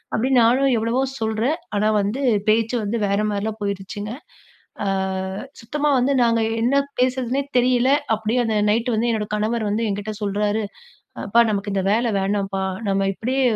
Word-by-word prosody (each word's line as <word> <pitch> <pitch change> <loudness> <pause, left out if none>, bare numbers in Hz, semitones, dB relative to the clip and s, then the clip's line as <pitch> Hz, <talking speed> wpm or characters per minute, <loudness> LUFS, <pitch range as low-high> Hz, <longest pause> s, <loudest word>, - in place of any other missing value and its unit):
அப்டின்னு 250 +2 +3
நானும் 260 +3 +3
எவ்வளவோ 230 +4 0 0.2
சொல்றேன், 225 +7 0 0.2
ஆனா 210 +1 +2
வந்து, 210 +7 -2 0.3
பேச்சு 225 +2 +2
வந்து 210 +3 -1
வேற 200 +1 +1
மாரிலாம் 210 +2 -3
போயிருச்சுங்க. 200 +1 -4 0.7
அ - - -1 0.7
சுத்தமா 295 +6 -1
வந்து 255 +2 +2
நாங்க 230 -1 +3 0.2
என்ன 245 +4 +2 0.2
பேசுறதுன்னே 255 +1 +1 0.2
தெரியல! 250 +1 +3 0.2
அப்டியே 220 +3 0
அந்த 225 -2 -1
நைட் 230 +4 +1
வந்து 230 +2 +1
என்னோட 215 -2 -1
கணவர் 215 +1 0
வந்து 215 +3 0
என்கிட்ட 205 +1 -3
சொல்றாரு, 205 +1 0 0.7
"அப்பா 230 +4 +4
நமக்கு 205 -1 -2
இந்த 195 - +1
வேல 230 +2 +2
வேணாம்ப்பா. 195 0 -1 0.3
நம்ம 195 0 +1
இப்டியே 255 +7 -1
220 Hz, 150 wpm, -22 LUFS, 205-245 Hz, 0.7 s, அப்பா